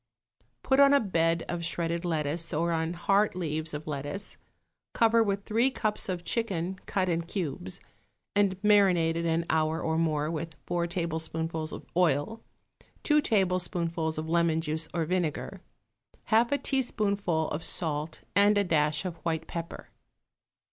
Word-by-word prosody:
Put 265 +1 +2
on 280 0 +7
a - - +6
bed 165 -6 +1
of 170 -1 -3
shredded 170 0 -1
lettuce 165 -1 -1
or 170 +2 +1
on 160 0 -1
heart 195 +4 +2
leaves 160 -3 -2
of 150 +1 -5
lettuce; 150 +7 -5 0.6
cover 230 0 +4
with 200 -2 -1
three 230 +4 +2
cups 215 -6 -2
of 180 -2 -3
chicken 190 -5 -2
cut 190 -2 0
in 170 -1 +1
cubes 155 - -4 0.6
and 200 -2 +2
marinated 175 -5 +4
an 165 +1 +1
hour 160 0 +1
or 160 0 0
more 155 -1 0
with 165 -1 -5
four 175 -1 -1
tablespoonfuls 160 -2 -2
of - - -8
oil, 175 +5 +1 0.6
two 300 0 +4
tablespoonfuls 175 - 0
of 155 +1 -3
lemon 170 -1 +2
juice 160 0 -2
or 165 -2 -1
vinegar, 175 -2 -2 0.7
half 235 +3 +4
a 285 - +3
teaspoonful 200 - 0
of 155 +2 -3
salt 155 -1 0
and 205 +1 +5
a 205 - +4
dash 155 -2 +1
of 175 -2 -4
white 160 -1 -2
pepper. 170 -1 -7
170 Hz, 150 wpm, -28 LUFS, 160-195 Hz, 0.7 s, on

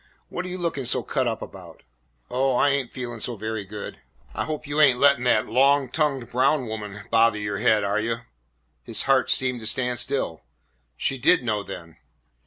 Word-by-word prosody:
What 180 - -4
are - - -5
you 180 0 -5
looking 165 -7 -3
so 120 - +2
cut 130 -2 -1
up 115 -1 -2
about?" 90 -4 -12 0.5
"Oh, 130 +1 +1
I 145 - +4
ain't 140 -3 -1
feelin' 120 -2 -6
so 120 +2 -2
very 110 0 -4
good." 105 +1 -8 0.3
"I - - -2
hope 155 -1 -5
you 145 +1 0
ain't 130 -5 +5
lettin' 140 -3 +4
that 110 -3 +3
long 135 +3 +3
tongued 135 -5 -1
Brown 130 +2 +2
woman 105 -3 -7
bother 115 -1 +4
your 105 -1 -3
head, 110 -1 +3
are 100 +1 0
you?" 115 +1 -2 0.6
His - - 0
heart 135 -1 +2
seemed 125 -2 +3
to 110 - -4
stand 125 +1 0
still. 120 - -1 0.6
She 135 -1 0
did 135 +2 +4
know, 110 -3 -1
then. 90 -5 -9
125 Hz, 195 wpm, -24 LUFS, 110-135 Hz, 0.6 s, ain't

